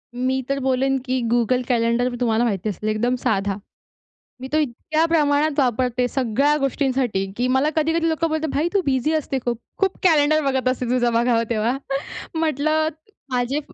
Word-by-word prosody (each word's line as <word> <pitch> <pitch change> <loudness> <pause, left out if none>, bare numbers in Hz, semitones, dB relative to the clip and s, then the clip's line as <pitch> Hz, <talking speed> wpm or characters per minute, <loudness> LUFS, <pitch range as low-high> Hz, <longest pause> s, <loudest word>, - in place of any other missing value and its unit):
मी 260 +1 0
तर 275 0 0
बोलेन 265 +1 +2
की 255 0 0
Google 240 +1 +2
Calendar 235 +1 +2
तुम्हाला 230 -2 +2
माहिती 215 -3 -1
असेल, 210 +2 -3
एकदम 235 +4 +1
साधा. 205 -5 0 0.9
मी 260 - -5
तो - - +4
इतक्या 305 +3 0
प्रमाणात 300 -2 +2
वापरते, 250 -1 +1
सगळ्या 265 +3 +1
गोष्टींसाठी 260 -7 0
की 245 +1 +1
मला 265 +4 +2
कधी-कधी 325 +1 +1
लोकं 325 +1 0
बोलतात, 315 0 -1
"भाई 295 +4 +1
तू 400 - +3
बिझी 265 +2 +1
असते 300 -3 -1
खूप. 240 -1 0 0.2
खूप 385 -1 0
कॅलेंडर 310 -3 +4
बघत 265 -1 0
असते 255 0 -1
तुझं 240 -1 +1
बघावं 230 0 +2
तेव्हा." 235 +3 0 0.6
म्हटलं 310 0 +1 0.4
माझे 250 +3 0
260 Hz, 160 wpm, -22 LUFS, 240-300 Hz, 0.9 s, तो